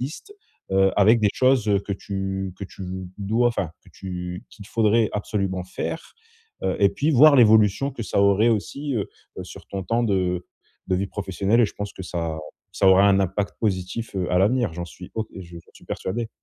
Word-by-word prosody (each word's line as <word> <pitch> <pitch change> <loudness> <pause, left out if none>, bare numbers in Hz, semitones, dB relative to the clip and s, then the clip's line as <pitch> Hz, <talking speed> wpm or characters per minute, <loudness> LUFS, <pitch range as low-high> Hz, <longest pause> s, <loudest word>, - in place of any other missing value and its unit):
liste, 155 - -6 0.4
heu, 95 0 +4
avec 110 +3 +5
des 105 - +4
choses, 130 -3 +3
heu, 100 -1 +4
que 100 - -5
tu 95 -1 -4
que 100 - -5
tu 95 - -10 0.4
dois 110 +5 +1
enfin, 95 -9 -2
que - - -18
tu 90 -1 -6
qu'il 100 -3 -13
faudrait 110 0 +2
absolument 100 -3 -2
faire, 95 - -5 0.5
heu, - - 0
et 100 - +6
puis 145 +10 0
voir 145 +2 +7
l'évolution 110 +2 +5
que 120 - -6
ça 100 - 0
aurait 100 +3 +4
aussi, 140 +6 -2
heu 100 - -1 0.3
heu, - - -5
sur - - -12
ton 95 -1 -4
temps 115 +5 0
de 90 -5 0 0.4
de 95 - +2
vie 100 - -1
professionnelle. 100 +3 0
Et - - +6
je - - -10
pense 100 0 -5
que - - -8
ça 85 -3 -3 0.4
ça 95 - +1
aura 95 +1 +6
un 100 - +4
impact 95 +2 -1
positif, 100 +1 -2
heu, 90 -2 -1
à 90 - +2
l'avenir, 105 0 +2
j'en 85 0 -4
suis 90 +2 -12
ob 110 -1 -2
et - - -9
je 85 -1 -14
j'en 85 -1 -12
suis - - -17
persuadé. 115 +4 -3
100 Hz, 210 wpm, -23 LUFS, 95-115 Hz, 0.5 s, voir